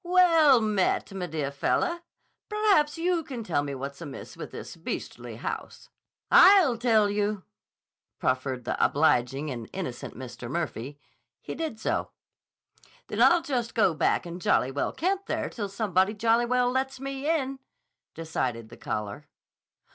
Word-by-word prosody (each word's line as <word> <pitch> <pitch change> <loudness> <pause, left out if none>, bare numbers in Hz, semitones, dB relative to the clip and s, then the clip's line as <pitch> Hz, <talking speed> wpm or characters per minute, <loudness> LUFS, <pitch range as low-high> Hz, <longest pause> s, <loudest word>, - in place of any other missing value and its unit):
"Well 335 -7 +5
met, 205 -2 0
m'deah 160 -7 -3
fellah! 340 - 0 0.5
Perhaps 410 -9 +2
you 340 0 0
can 255 -6 -6
tell 165 -8 0
me 140 -1 -4
what's 140 +3 -6
amiss 145 -5 -8
with - - -7
this - - -8
beastly - - -6
house." - - -6 0.4
"I'll 365 -9 +7
tell 225 -3 +4
you," 205 -1 -1 0.7
proffered 130 -1 -1
the - - 0
obliging 140 -1 +2
and 120 -3 -6
innocent 170 -11 -6
Mr. 125 -2 -8
Murphy. 145 -3 -4 0.4
He - - -7
did 315 -9 -4
so. - - -1 1.0
"Then - - -1
I'll 345 -1 +6
just 245 -4 -2
go 205 -7 +4
back 155 - +1
and 175 +1 -7
jolly 130 -5 +2
well 140 - -1
camp 380 +3 -1
there - - -1
till 205 -4 -5
somebody 200 0 +1
jolly 230 +2 +2
well 250 0 +2
lets 265 +1 -2
me 275 +2 -4
in," 275 -4 0 0.6
decided 125 -8 -3
the 115 - -12
caller. 105 +8 -5
205 Hz, 145 wpm, -27 LUFS, -, 1.0 s, I'll